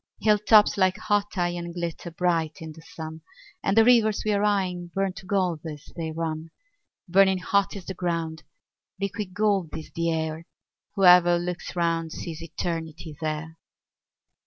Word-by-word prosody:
Hill 210 -1 +3
tops 210 0 +5
like 185 -1 +3
hot 205 -1 -1
iron 175 -1 -2
glitter 170 0 -4
bright 165 -2 0
in 160 -1 -7
the 160 +1 -13
sun, 160 0 -8 0.4
And 195 +2 0
the 225 - +7
rivers 225 -4 +4
we're 205 -1 +1
eying 190 -4 0
burn 195 -1 0
to 185 - -11
gold 185 -5 +1
as 150 -3 -8
they 160 -2 -4
run; 160 0 -4 0.6
Burning 190 +1 +4
hot 200 +3 +1
is 190 -3 -8
the 190 - -4
ground, 165 -3 -3 0.6
liquid 200 -1 -4
gold 200 -6 +1
is 160 - -9
the 170 0 0
air; 160 0 -3 0.5
Whoever 180 -3 +7
looks 175 +1 -5
round 165 -2 0
sees 160 -2 -6
Eternity 165 -1 -5
there. 155 +1 -4
175 Hz, 155 wpm, -26 LUFS, 160-195 Hz, 0.6 s, the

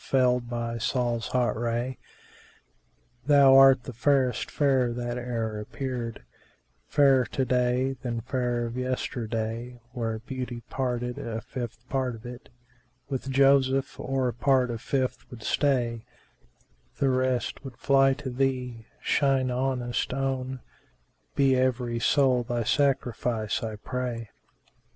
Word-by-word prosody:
felled 125 -2 +2
by 115 -1 -3
Sol's 120 -1 -1
hot 125 -1 +1
ray: 120 +2 -2 1.3
Thou 140 -2 +7
art 135 -2 +7
the 125 - -7
fairest 130 +1 +1
fair 135 -4 +2
that 120 0 -3
e'er 115 -3 -3
appeared, 115 - -5 0.3
* - - -43
Fairer 135 -3 +6
to 130 - -1
day 125 +1 +1
than 120 -3 -3
fair 125 -1 -1
of 115 0 -5
yesterday:[FN#384] 120 -1 -3
Were 115 -3 -2
Beauty 125 -2 -5
parted, 125 -2 -2
a 115 -1 -4
fifth 120 -1 -7
part 130 -3 -1
of 115 +2 -13
it 120 0 -9 0.3
* 125 +1 -41
With 135 0 -3
Joseph 135 0 +3
or 135 -1 0
a 120 - -1
part 130 0 +2
of 115 -1 -5
fifth 130 -2 -2
would 115 -3 -10
stay; 120 -5 +1 0.9
The 135 - +2
rest 130 0 0
would 130 -4 -9
fly 135 -1 +4
to 140 -2 -6
thee, 125 -3 -2 0.2
shine 135 -2 +2
ownest 125 -1 -1
own; 130 -1 -2 0.4
* - - -43
Be 135 -1 +4
every 125 -2 0
soul 130 -1 +3
thy 120 0 -2
sacrifice, 120 -4 0
I 110 -1 -4
pray!" 120 0 -4
125 Hz, 135 wpm, -27 LUFS, 120-130 Hz, 1.3 s, Thou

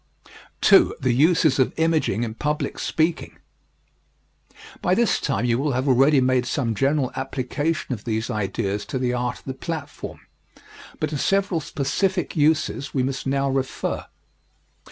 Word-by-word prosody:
II. - - +7
THE 130 -2 +1
USES 155 +1 +3
OF 130 - +2
IMAGING 160 -9 +1
IN 110 -2 -3
PUBLIC 150 +5 -2
SPEAKING 160 +1 -1 1.4
By 180 - +2
this 235 -1 +2
time 100 +5 -1
you 120 0 +1
will 145 0 0
have 130 +3 -1
already 135 +3 +5
made 130 -1 +2
some 120 -5 -1
general 135 +4 +1
application 135 +3 -2
of 110 -3 -7
these 110 -1 -2
ideas 100 -1 -2
to 135 - -3
the 125 -1 0
art 125 0 -2
of - - -19
the 130 - -4
platform, 145 +1 -6 0.8
but 155 -1 -1
to 145 - -2
several 195 -1 +1
specific 180 +6 -1
uses 150 -2 +1
we 130 - +2
must 135 +1 -3
now 140 0 +1
refer. 135 -1 -2
135 Hz, 150 wpm, -23 LUFS, 125-155 Hz, 1.4 s, II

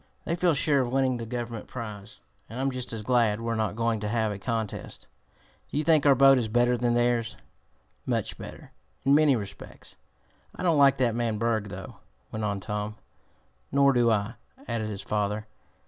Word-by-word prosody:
They 170 - 0
feel 175 -2 +2
sure 140 0 +3
of 120 -2 -2
winning 130 -1 +1
the 115 -1 -6
Government 120 -2 -5
prize, 105 - -8 0.3
and 115 +4 -7
I'm 135 +1 0
just 125 -1 -4
as 110 -2 -5
glad 115 -3 +2
we're 115 0 -2
not 110 -2 -1
going 115 -1 0
to 105 - -3
have 110 0 0
a 100 - -6
contest." 110 0 -4 0.6
"Do - - -4
you 150 - +1
think 155 -2 +4
our 140 - +7
boat 135 0 +6
is 115 - -1
better 120 +2 +2
than 120 0 +1
theirs?" 120 -1 +1 0.7
"Much - - -1
better, - - -10 0.3
in 140 - +5
many 150 -2 +5
respects." 100 -4 -8 0.6
"I - - -6
don't 165 -5 +3
like 140 -1 +6
that 125 -3 +2
man 115 -2 -1
Berg, 110 -2 0
though," - - -8 0.3
went 110 0 -4
on 100 -1 -1
Tom. 105 +2 -4 0.8
"Nor 140 0 +4
do 120 -2 +3
I," 105 0 0 0.3
added 115 -2 -2
his 100 -2 -5
father. 105 0 -1
115 Hz, 190 wpm, -27 LUFS, 110-130 Hz, 0.8 s, our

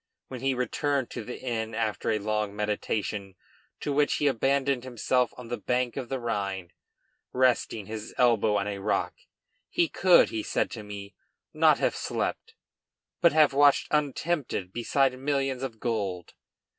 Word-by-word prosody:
When 130 -2 -7
he 135 0 +1
returned 135 +1 -1
to - - -5
the 125 - -7
inn 115 -3 -3
after 110 -4 -1
a 110 - +2
long 105 -1 -2
meditation 105 -1 -2 0.5
to 145 - -1
which 145 +1 +2
he 150 - -1
abandoned 135 0 +1
himself 125 0 0
on 125 -2 -9
the 120 - -3
bank 125 -1 0
of 130 -3 -5
the 135 - -2
Rhine, 100 -6 -3 0.6
resting 125 -4 +1
his 110 +1 -6
elbow 115 -4 +3
on 100 - -1
a 100 -1 -3
rock, 105 +2 0 0.6
he 170 - +2
could, 180 +2 +5
he 110 - -2
said - - -1
to 115 - -6
me, 100 -1 -8 0.4
not - - +5
have - - 0
slept, - - -3 0.7
but 170 -2 +6
have 155 -3 +5
watched 145 0 +4
untempted 145 - -1
beside 130 +2 +1
millions 135 -2 -1
of 120 -5 -5
gold. 100 -7 -3
120 Hz, 155 wpm, -27 LUFS, 105-135 Hz, 0.7 s, but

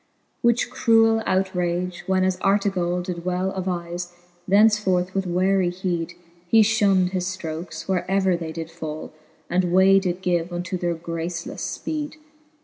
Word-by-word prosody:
Which 235 +1 +2
cruell 225 -1 +4
outrage 180 -1 -1
when 190 0 +2
as 185 -1 +1
Artegall 190 -3 +1
Did 175 -1 -5
well 180 +1 -1
diN'vLQ^ 175 -1 -4 0.4
thenceforth 195 -3 +3
with 195 -1 -1
wearic 180 0 +1
heed 175 -2 -2 0.3
He 225 +5 +6
fhund 200 -4 +3
his 180 -1 -2
ftrokes, 160 -3 -6
where 185 -1 -1
ever 190 -1 +2
they 165 -2 -5
did 165 0 -6
fall, 155 -1 -7 0.3
And 180 0 0
way 190 +2 +6
did 185 -1 -3
give 175 -1 0
unto 175 +2 -3
their 175 -1 -1
gracelefle 165 0 -5 0.3
fpeed. 300 -1 -3
180 Hz, 140 wpm, -23 LUFS, 175-195 Hz, 0.4 s, He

